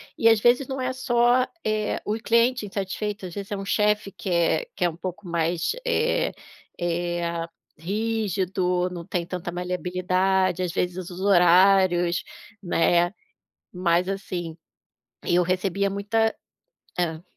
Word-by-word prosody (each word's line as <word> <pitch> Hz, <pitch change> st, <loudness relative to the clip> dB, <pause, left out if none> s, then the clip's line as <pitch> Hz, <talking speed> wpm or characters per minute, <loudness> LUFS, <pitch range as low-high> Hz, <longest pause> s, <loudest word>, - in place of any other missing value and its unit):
E, 230 Hz, -, +4 dB
às 225 Hz, -2 st, +5 dB
vezes, 245 Hz, +4 st, +3 dB
não 270 Hz, 0 st, -4 dB
é 255 Hz, 0 st, -1 dB
só, 245 Hz, 0 st, +2 dB, 0.2 s
eh, 215 Hz, -1 st, 0 dB
o 210 Hz, -, 0 dB
cliente 235 Hz, +2 st, +2 dB
insatisfeito, 200 Hz, +1 st, -4 dB
às 180 Hz, -, -7 dB
vezes, 200 Hz, +2 st, -7 dB
é 205 Hz, -, -1 dB
um 195 Hz, -, -5 dB
chefe, 210 Hz, 0 st, +1 dB
que 190 Hz, 0 st, -7 dB
é 170 Hz, -, +2 dB
que -, -, 0 dB
é 175 Hz, -, +3 dB
um 160 Hz, -, -9 dB
pouco 180 Hz, 0 st, -6 dB
mais, 170 Hz, 0 st, 0 dB
eh 485 Hz, 0 st, +1 dB, 0.5 s
eh, 175 Hz, 0 st, -1 dB, 0.6 s
rígido, 190 Hz, -2 st, -1 dB
não 175 Hz, -1 st, -6 dB
tem 175 Hz, 0 st, -2 dB
tanta 175 Hz, 0 st, -5 dB
maleabilidade. 185 Hz, +1 st, 0 dB
Às 180 Hz, -, -2 dB
vezes, 180 Hz, 0 st, -2 dB
os 180 Hz, -, -9 dB
horários, 180 Hz, -1 st, +4 dB, 0.4 s
né, 175 Hz, -1 st, +2 dB, 0.6 s
mas, 180 Hz, 0 st, +1 dB
assim, 180 Hz, -4 st, -4 dB, 0.7 s
eu 175 Hz, +1 st, +3 dB
recebia 190 Hz, +2 st, 0 dB
muita 220 Hz, +3 st, 0 dB, 0.6 s
hã? 165 Hz, -1 st, -1 dB
185 Hz, 140 wpm, -25 LUFS, 175-210 Hz, 0.7 s, às